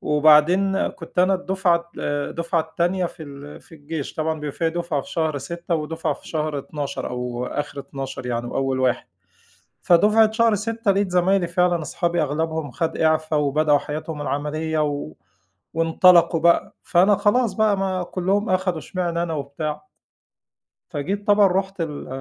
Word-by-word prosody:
وبعدين 155 +6 +4
كنت 170 -1 -10
أنا 185 +2 +4
الدُفعة 185 -2 0
آآ 145 0 -2
الدُفعة 170 0 -1
التانية 175 +3 -1
في 165 - -10
ال 145 0 -10
في - - -16
الجيش، 150 -1 -6
طبعًا 160 0 -1
بيبقي 145 -2 -4
فيه 165 -1 +1
دُفعة 170 -3 -2
في 185 - -12
شهر 160 -5 -1
6 170 +4 -4
ودُفعة 160 +1 -2
في - - -15
شهر 155 -2 -2
12 145 0 -5
أو 125 0 -4
آخر 145 -1 -4
12 135 -2 -7
يعني، 120 -1 -2
وأول 135 +1 -1
1. 130 -2 +1 0.8
فدُفعة 215 +5 +5
شهر 230 0 +3
6 225 +1 -1
لقيت 195 -1 +1
زمايلي 180 +1 +2
فعلًا 175 -1 +1
أصحابي 170 +2 -1
أغلَبهم 160 +1 -2
خد 160 +6 -2
إعفا، 155 0 +1
وبدأوا 150 0 +3
حياتهم 150 +2 -6
العملية، 150 +3 -2
و 145 - -3 0.6
وإنطلقوا 165 0 +4
بقى، 170 +1 +3
فأنا 190 +3 +4
خلاص 225 +3 +2
بقى 215 -3 +2
ما 190 -1 -1
كلّهم 195 +5 -1
أخدوا 185 -2 0
إشمعنا 170 0 -2
أنا 165 -2 -2
وبتاع. 150 +1 -4 1.1
فجيت 195 +8 -3
طبعًا 205 -1 +5
رُحت 190 0 -1
ال 150 -3 -4
165 Hz, 155 wpm, -22 LUFS, 150-185 Hz, 1.1 s, فدُفعة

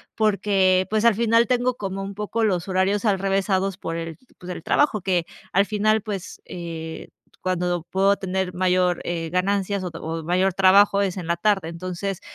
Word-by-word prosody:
Porque, 195 -3 +2
pues, 215 0 +1
al 235 -2 +5
final 230 +1 +3
tengo 250 0 +1
como 195 -3 -4
un 195 +1 -5
poco 210 +2 -1
los 180 -5 0
horarios 190 +2 +1
alrevesados 195 -2 0
por 165 -4 -4
el, 165 -1 -6 0.2
pues, 180 - -11
el 170 - -7
trabajo, 270 - +2
que 180 -2 0 0.3
al 195 +2 +3
final, 215 +1 +1
pues, 200 -2 -6
eh, 165 -2 -7 0.3
cuando 180 -2 -1
puedo 195 +1 +2
tener 190 -1 -2
mayor, 180 0 +1
eh, 165 -1 -3
ganancias, 195 +2 0
o - - -2
o 160 0 -5
mayor 185 +2 +2
trabajo 195 +2 +5
es 195 -3 -1
en 185 -3 -5
la 170 +1 0
tarde. 195 -3 +1
Entonces, 185 +2 -4
190 Hz, 175 wpm, -23 LUFS, 180-205 Hz, 0.3 s, al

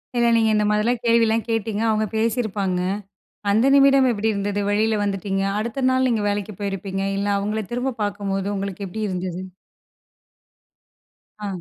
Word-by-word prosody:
இல்ல. 235 -1 +3
நீங்க 225 -1 +3
இந்த 210 - +2
மாதிரிலாம் 220 +3 +1
கேள்விலாம் 230 -1 +3
கேட்டீங்க. 220 -1 -1
அவுங்க 215 0 +1
பேசியிருப்பாங்க. 215 -5 0 0.7
அந்த 220 +5 +3
நிமிடம் 275 -1 +6
எப்பிடி 220 0 0
இருந்தது? 205 0 -1
வெளில 215 +1 +1
வந்துட்டீங்க. 195 -1 -1 0.2
அடுத்த 235 +4 -2
நாள் 260 0 +2
நீங்க 220 -3 0
வேலைக்கு 205 0 -3
போயிருப்பீங்க. 195 -1 -3 0.2
இல்ல, 200 +1 -1
அவுங்களே 210 +1 -2
திரும்ப 250 0 -2
பார்க்கும்போது 200 -1 -2
உங்களுக்கு 195 0 -4
எப்பிடி 215 +3 -3
இருந்தது? 185 -1 -4 2.0
ஆ. - - -2
210 Hz, 140 wpm, -22 LUFS, 200-230 Hz, 2.0 s, நிமிடம்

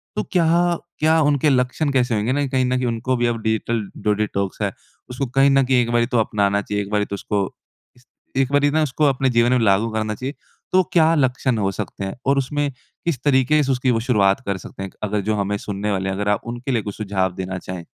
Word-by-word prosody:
तो - - -1
क्या 175 0 +3 0.2
क्या 160 +1 +4
उनके 145 0 +3
लक्षण 130 +3 +1
कैसे 125 -3 +1
होंगे 110 +4 0
ना 145 +1 +1
कहीं 130 -1 +1
न 125 0 0
कहीं 125 - -1
उनको 120 +3 -1
भी 120 - +1
अब 115 -1 -2
डिजिटल 110 +1 0 0.2
डो 105 - +3
डिटॉक्स 100 -2 -2
है - - 0 0.4
उसको 125 +2 -3
कहीं 135 +1 +5
न 135 0 +4
कहीं 130 0 +2
एक 115 - -2
बारी 120 0 +3
तो 120 - +4
अपनाना 100 -2 +1
चाहिए 105 0 -2
एक 100 - -10
बारी 105 0 +1
तो - - -8
उसको 100 0 -1 0.5
इस 125 0 -24 0.3
एक 135 0 +1
बारी 145 0 +3
ना 155 0 +2
उसको 150 +2 0
अपने 135 -1 +2
जीवन 120 0 +3
में 125 - +3
लागू 105 +1 +3
करना 110 -1 -1
चाहिए। 130 +6 -5 0.4
तो 185 0 +4
क्या 165 -1 +5
लक्षण 130 -3 +1
हो 100 -2 0
सकते 95 - -5
हैं 95 - -5
और 140 0 +3
उसमें 145 +2 0 0.4
किस 160 -8 0
तरीके 145 +2 +3
से 135 - 0
उसकी 125 0 +1
वो 115 - +1
शुरुआत 100 -5 +2
कर 100 -1 -1
सकते 95 - -9
हैं? - - -4
एक - - -26
अगर 105 0 0
जो 105 +2 -1
हमें 100 0 -1
सुनने 105 +1 -3
वाले 95 0 -1
हैं 95 - -2
अगर 105 +1 -1
आप 105 - +1
उनके 120 +3 -4
लिए 115 -3 +1
कुछ 105 -1 -6
सुझाव 95 -3 -1
देना 95 -1 -4
चाहें। 90 -1 -7
120 Hz, 245 wpm, -21 LUFS, 105-135 Hz, 0.5 s, कहीं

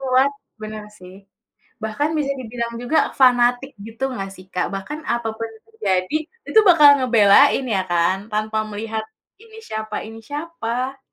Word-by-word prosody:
Kuat, 265 +1 +2 0.3
bener 215 0 -6
sih. 185 +1 -13 0.7
Bahkan 220 +8 -1
bisa 275 -2 0
dibilang 235 -1 -5
juga 245 +6 +2 0.2
fanatik 245 +1 +4 0.2
gitu 225 +4 -8
nggak 195 -6 -5
sih, 185 - -14
Kak? 180 - 0
Bahkan 195 +11 -5
apapun 225 -1 -2
yang 220 - -19
terjadi, 190 - -1 0.3
itu 440 - +6
bakal 305 -4 +8
ngebelain 240 +2 +5
ya 190 - +2
kan, 170 +2 +2
tanpa 215 +1 -1
melihat, 220 +1 -4 0.4
ini 445 -1 -15
siapa 215 - -5
ini 225 0 -10
siapa. 275 -4 -4
235 Hz, 145 wpm, -21 LUFS, 215-270 Hz, 0.7 s, bakal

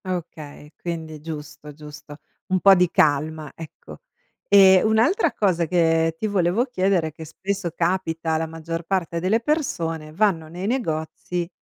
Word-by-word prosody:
Okay. 160 -5 -7
Quindi, 160 -3 -6
giusto, 150 -1 -8
giusto. 150 0 -11 0.3
Un 185 0 +1
po' 195 +2 +7
di 180 -2 +3
calma, 155 0 +1
ecco. 160 -2 -11 0.5
Eh, 190 -2 +7
un'altra 250 - +2
cosa 180 -5 +1
che 165 -1 +2
ti 220 - -3
volevo 195 +3 +1
chiedere 190 -8 0
è - - -6
che 160 +1 -10
spesso 190 +4 -4
capita 165 -2 -1
la 160 0 -2
maggior 165 +1 -6
parte 170 -2 -2
delle 190 +6 +1
persone, 165 - -2
vanno 170 -3 +1
nei 175 +5 -6
negozi, 175 -6 -3
170 Hz, 145 wpm, -23 LUFS, 160-190 Hz, 0.5 s, po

